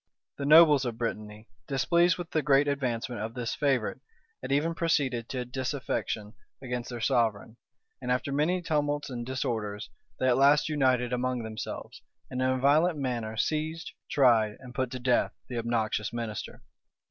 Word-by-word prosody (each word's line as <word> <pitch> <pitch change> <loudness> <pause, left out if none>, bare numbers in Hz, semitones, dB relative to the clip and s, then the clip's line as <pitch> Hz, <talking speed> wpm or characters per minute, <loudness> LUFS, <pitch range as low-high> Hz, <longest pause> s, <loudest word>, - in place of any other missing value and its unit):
The 140 - -2
nobles 150 -3 +7
of 120 -3 -3
Brittany, 110 -2 -5 0.2
displeased 170 +5 +3
with 175 -2 -7
the 155 - +1
great 145 0 +4
advancement 125 -5 -2
of 110 +1 -5
this 120 -2 -3
favorite, 135 -6 0 0.4
had - - -5
even 150 +4 +2
proceeded 135 -9 0
to 125 -2 -3
disaffection 125 -4 -3 0.3
against 125 -2 -4
their 120 -1 -5
sovereign; 115 -1 0 0.4
and - - -2
after 130 +3 0
many 165 +6 +1
tumults 145 -3 -1
and 120 -1 -4
disorders, 110 -5 -3 0.3
they 130 - 0
at 125 - +4
last 145 +3 +4
united 130 -4 +1
among 125 -1 -1
themselves, 110 -1 -7 0.3
and 130 - -2
in 130 - +2
a 130 - +1
violent 150 +5 +3
manner 120 -5 -3
seized, 160 +5 -2 0.2
tried, 115 -6 +3
and 125 -2 -11
put 130 -1 -1
to 130 - -5
death 125 -1 +1 0.2
the 120 -2 -3
obnoxious 110 -2 -1
minister. 115 -2 -5
130 Hz, 160 wpm, -28 LUFS, 115-145 Hz, 0.4 s, nobles